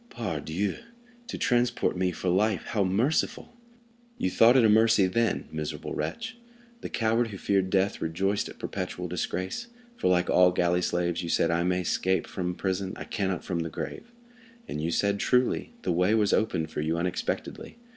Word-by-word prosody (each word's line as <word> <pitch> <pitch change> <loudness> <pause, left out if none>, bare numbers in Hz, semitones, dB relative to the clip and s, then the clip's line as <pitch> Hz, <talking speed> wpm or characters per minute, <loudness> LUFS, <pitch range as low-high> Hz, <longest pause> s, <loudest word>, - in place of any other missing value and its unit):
"Pardieu! 95 -2 -3 0.5
to - - -5
transport 120 -3 +1
me 90 0 +1
for 90 - -5
life, 95 +2 +2
how 105 -4 +1
merciful!" 115 - 0 0.6
"You 95 - -1
thought 120 +6 +6
it 120 - +5
a - - +7
mercy 110 -2 +5
then, 110 +3 0
miserable 75 -1 -4
wretch! 85 - -4 0.4
The - - -6
coward 115 +1 +1
who 105 -3 -7
feared 95 -1 +1
death 95 +2 +1
rejoiced 95 +5 -1
at - - -11
perpetual 90 -2 -4
disgrace; 90 - -3 0.3
for - - 0
like 90 0 +3
all 90 0 +5
galley 90 0 +2
slaves, 85 0 0
you 85 - -5
said, 85 +1 +2
'I 85 0 +1
may 90 0 +1
escape 95 +2 0
from 90 -2 -3
prison, 95 0 -2
I - - -6
cannot 95 -5 -2
from 90 -3 -2
the 80 0 -2
grave.' 235 - -6 0.6
And 75 - -4
you 80 - -1
said 100 +4 +1
truly; 125 +3 +1
the - - 0
way 90 +5 +3
was 105 -2 +2
opened 85 -8 0
for - - -3
you 80 +2 0
unexpectedly. 90 - -3
95 Hz, 175 wpm, -27 LUFS, 90-110 Hz, 0.6 s, a